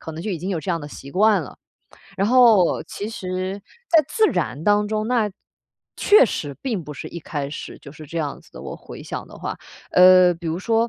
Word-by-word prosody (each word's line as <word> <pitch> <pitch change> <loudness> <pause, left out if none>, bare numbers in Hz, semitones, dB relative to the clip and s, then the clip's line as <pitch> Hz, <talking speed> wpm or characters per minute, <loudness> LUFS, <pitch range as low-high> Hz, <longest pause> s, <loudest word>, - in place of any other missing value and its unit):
可 160 - -7
能 160 +1 -7
就 205 +2 -3
已 - - -2
经 185 +4 -4
有 180 - -1
这 155 - -8
样 170 -2 0
的 145 - -8
习 140 -1 -11
惯 210 0 +4
了。 130 - -11 0.6
然 195 +2 +1
后 235 -8 +5
其 205 - -6
实 185 -2 -4 0.3
在 320 -3 +5
自 435 +8 +2
然 140 +5 -2
当 205 +1 +3
中， 215 +1 -2
那 235 -4 +2 0.7
确 415 -9 +6
实 145 -7 -4
并 220 - -3
不 150 - -7
是 - - -7
一 170 - -7
开 145 -3 -4
始 155 - -7
就 140 - -12
是 155 +1 -12
这 170 - -8
样 145 -3 -3
子 - - -23
的， - - -10
我 - - -7
回 - - -11
想 - - -6
的 - - -14
话。 - - -5 0.3
呃， 180 0 +7
比 170 0 -9
如 160 +1 -1
说 225 +3 +1
185 Hz, 250 characters per minute, -22 LUFS, 160-215 Hz, 0.7 s, 呃